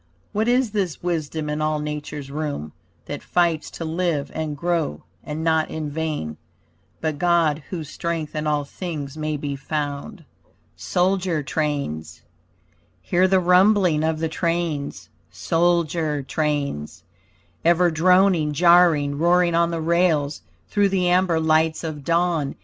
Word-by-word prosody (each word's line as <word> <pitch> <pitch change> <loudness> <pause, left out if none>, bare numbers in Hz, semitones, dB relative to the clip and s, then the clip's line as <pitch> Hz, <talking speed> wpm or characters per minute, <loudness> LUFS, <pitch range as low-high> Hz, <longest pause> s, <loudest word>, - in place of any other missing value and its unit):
What 215 +2 0
is 245 -2 +2
this 190 -7 -2
wisdom 160 -3 -2
in 150 +1 -2
all 155 0 +1
nature's 150 -2 -5
room 145 - -4 0.3
That 145 - -6
fights 170 -3 0
to 165 - -6
live 160 -3 -1
and 155 -2 -3
grow, 170 - -1 0.2
and 150 +2 -5
not 160 -1 +2
in 155 -2 -4
vain, 150 - -3 0.6
But 155 -2 -2
God, 165 -3 +2
whose 160 -6 -5
strength 165 -3 -3
in 150 0 -2
all 150 -1 +1
things 150 -3 -6
may 155 -1 -2
be 140 -1 -4
found. 150 +6 -4 0.5
SOLDIER 180 -3 0
TRAINS 135 - -3 0.8
Hear 185 - +3
the 190 0 +4
rumbling 180 -2 +4
of 160 0 0
the 160 +1 -1
trains, 165 -3 -2 0.2
Soldier 165 -3 0
trains. 140 - -2 0.6
Ever 175 +1 +4
droning, 180 -1 +3
jarring, 165 -3 +4
roaring 175 +1 +3
on 170 0 +3
the 165 -1 -3
rails 160 -3 +1 0.3
Through 205 -1 +2
the 185 -2 +1
amber 180 -2 +3
lights 160 0 +2
of 155 -3 -5
dawn. 170 -3 0
160 Hz, 135 wpm, -23 LUFS, 150-175 Hz, 0.8 s, the